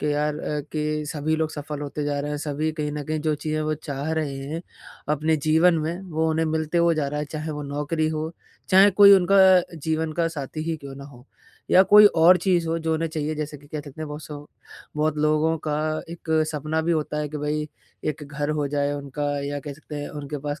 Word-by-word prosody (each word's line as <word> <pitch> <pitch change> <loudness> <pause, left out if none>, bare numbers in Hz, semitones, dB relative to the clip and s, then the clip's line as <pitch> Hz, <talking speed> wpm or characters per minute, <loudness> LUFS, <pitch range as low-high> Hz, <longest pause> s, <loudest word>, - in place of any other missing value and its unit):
कि 150 +1 0
यार 150 +1 0
अ, 150 -1 -3
कि 150 0 -1
सभी 155 +1 -1
लोग 160 0 -1
सफल 150 -1 -6
होते 145 +1 -4
जा 145 -1 -1
रहे 145 +1 -4
हैं 145 - -3
सभी 150 +1 -2
कहीं 150 -2 -3
न 150 -1 -4
कहीं 155 +1 -2
जो 155 0 0
चीज़ें 155 +1 -3
वो 155 0 0
चाह 140 +3 -2
रहे 150 -4 -2
हैं 165 +3 -4 0.5
अपने 155 +2 +1
जीवन 160 +4 +4
में, 165 +4 -3
वो 160 -3 -1
उन्हें 160 0 +1
मिलते 160 +2 0
हुए 170 -1 +4
जा 145 -3 -1
रहा 150 +1 -3
है, 150 - -3
चाहे 155 +2 -5
वो 150 -1 -5
नौकरी 150 +3 -1
हो, 155 0 -3 0.4
चाहे 195 +2 +7
कोई 200 +1 +8
उनका 195 +1 +3 0.4
जीवन 160 +1 -2
का 165 +1 0
साथी 155 -1 -5
ही 160 - -1
क्यों 140 -2 -9
ना 140 - -9
हो। 130 -2 -15 0.4
या 185 - +8
कोई 210 +2 +8
और 170 +3 +7
चीज़ 175 -4 +2
हो 165 - 0
जो 160 - +1
उन्हें 165 +1 -1
चाहिए 155 -1 -3
जैसे 150 -1 -4
कि 145 - -18
कह 150 - -4
सकते 145 +1 -11
हैं 155 - -3
बहुत 150 +1 -7
सौ 145 -1 -9 0.5
बहुत 155 0 +1
लोगों 155 +2 +2
का 150 - 0 0.4
एक 170 -1 -8 0.2
सपना 155 +2 -1
भी 170 - +1
होता 150 -1 -1
है 150 -1 -2
कि 150 - -6
भाई 150 +1 -2 0.4
एक 155 0 -3
घर 145 +1 -3
हो 145 -1 0
जाए 145 0 0
उनका 145 0 -4 0.2
या 145 0 -3
कह 145 0 -7
सकते 150 +1 -10
हैं 145 - -5
उनके 145 0 -6
पास 145 0 -3
155 Hz, 235 wpm, -24 LUFS, 145-160 Hz, 0.5 s, कोई